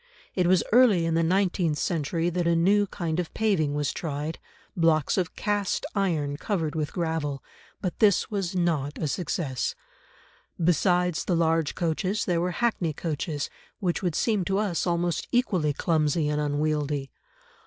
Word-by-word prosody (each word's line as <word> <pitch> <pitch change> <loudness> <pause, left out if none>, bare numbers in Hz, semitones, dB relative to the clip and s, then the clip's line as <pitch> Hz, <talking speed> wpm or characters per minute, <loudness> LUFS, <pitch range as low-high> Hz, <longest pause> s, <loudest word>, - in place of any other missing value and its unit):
It 180 -2 +1
was 180 -2 +4
early 220 -8 +5
in 165 - 0
the 165 - +3
nineteenth 175 -2 +1
century 165 +1 -1
that 175 0 0
a 170 - +3
new 200 +5 +3
kind 170 -3 -3
of 175 - -3
paving 175 -10 +1
was 145 -1 -1
tried, 150 0 -4 0.4
blocks 160 -4 +2
of 180 -2 -1
cast 205 -2 -1
iron 160 -8 0
covered 165 -5 -2
with 155 -2 -2
gravel, 160 -5 -2 0.4
but 185 -3 -3
this 210 -2 +3
was 195 -3 -2
not 160 -5 0
a 155 - -2
success. 145 -4 -2 0.8
Besides 175 0 +2
the 180 - +1
large 165 -2 +1
coaches 185 +5 -1
there 170 -2 +1
were 180 - 0
hackney 180 -5 0
coaches, 150 -1 -3 0.3
which 180 -5 -1
would 175 -5 -1
seem 215 -5 +1
to 195 +1 0
us 200 -4 0
almost 175 0 0
equally 190 -11 +2
clumsy 155 0 +1
and 150 0 0
unwieldy. 145 -1 -1
170 Hz, 155 wpm, -26 LUFS, 155-185 Hz, 0.8 s, early